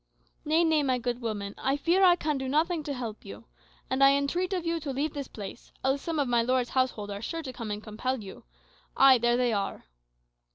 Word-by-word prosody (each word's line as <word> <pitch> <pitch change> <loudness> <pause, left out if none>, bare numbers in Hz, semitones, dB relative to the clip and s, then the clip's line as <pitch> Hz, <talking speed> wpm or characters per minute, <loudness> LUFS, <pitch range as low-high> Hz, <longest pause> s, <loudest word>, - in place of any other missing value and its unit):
"Nay, 320 +2 +3
nay, 320 -2 +3
my 260 -3 +1
good 245 0 -3
woman; 205 -3 -4
I 270 +1 0
fear 345 +6 +2
I 355 -2 +7
can 300 -4 -2
do 265 - -3
nothing 315 +4 +1
to 285 - -2
help 230 -4 -6
you. 205 +3 -10 0.4
And 260 +1 +1
I 275 0 +7
entreat 345 +7 -1
of 360 -3 -2
you 335 0 0
to 295 -2 -6
leave 285 +3 -2
this 280 -3 -5
place, 205 +1 -9
else 270 +1 +1
some 330 -2 -3
of 285 -3 +1
my 240 -1 +3
lord's 250 +1 0
household 245 -6 0
are 200 0 -5
sure 330 +8 -4
to 260 -3 -6
come 230 -3 -6
and 210 +1 -4
compel 255 +4 -3
you. 190 - -10 0.5
Ay, 265 -2 +7
there 240 +1 +2
they 245 -2 +1
are." 200 - -3
260 Hz, 230 wpm, -28 LUFS, 235-305 Hz, 0.5 s, I